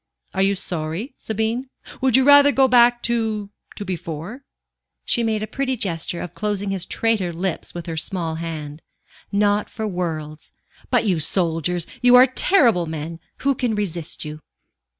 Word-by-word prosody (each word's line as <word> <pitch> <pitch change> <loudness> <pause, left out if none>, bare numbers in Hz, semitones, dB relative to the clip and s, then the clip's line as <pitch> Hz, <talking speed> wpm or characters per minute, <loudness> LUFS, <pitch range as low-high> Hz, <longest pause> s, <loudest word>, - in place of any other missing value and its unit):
"Are 190 - 0
you 195 +1 +3
sorry, 175 - -4
Sabine? 225 +4 -2 0.3
Would 260 -2 +4
you 265 - +4
rather 285 +1 +7
go 270 -1 +4
back 240 -1 +5
to 220 -3 -1 0.2
to 205 - -5
before?" 175 - -5 0.6
She 235 - +2
made 220 -2 0
a - - -1
pretty 260 +4 -2
gesture 170 -4 -2
of 175 - -7
closing 205 -2 -2
his 190 -2 -2
traitor 220 -6 0
lips 175 +1 -4
with 170 -1 -6
her 165 -1 -5
small 170 -1 -1
hand. 155 -2 -6 0.5
"Not 205 0 +1
for 220 - -5
worlds. 160 -5 -4 0.4
But - - +2
you 185 -6 +1
soldiers 170 +1 0 0.2
you 250 0 +6
are 250 +1 +9
terrible 245 - +3
men! 160 +1 -5 0.3
Who 280 - +4
can 245 -4 -1
resist 175 -7 -3
you?" 150 0 -7
200 Hz, 160 wpm, -22 LUFS, 165-235 Hz, 0.6 s, are